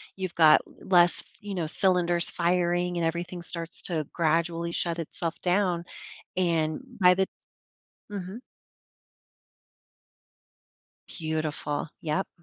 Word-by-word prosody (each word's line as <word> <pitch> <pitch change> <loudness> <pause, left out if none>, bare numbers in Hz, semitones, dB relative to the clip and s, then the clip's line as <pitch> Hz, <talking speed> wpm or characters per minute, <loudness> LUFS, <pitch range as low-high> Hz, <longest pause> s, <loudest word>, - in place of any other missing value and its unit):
you've 185 -2 -4
got 155 -2 +7
less 175 -2 +3
f - - -26
you 205 -2 -6
know, 170 -4 -1
cylinders 175 0 +2
firing 175 0 +1
and 170 - +1
everything 175 +2 -3
starts 165 0 -5
to 160 -4 -1
gradually 170 +1 +1
shut 170 0 -1
itself 165 +1 -4
down, 180 -2 +1 0.5
and 165 -2 +1 0.2
by 180 0 +8
the 190 +1 +1 0.8
Mhm? 195 +2 -5 2.7
Beautiful, 155 -2 -3
yep. 165 +4 -1
175 Hz, 105 wpm, -27 LUFS, 165-180 Hz, 2.7 s, by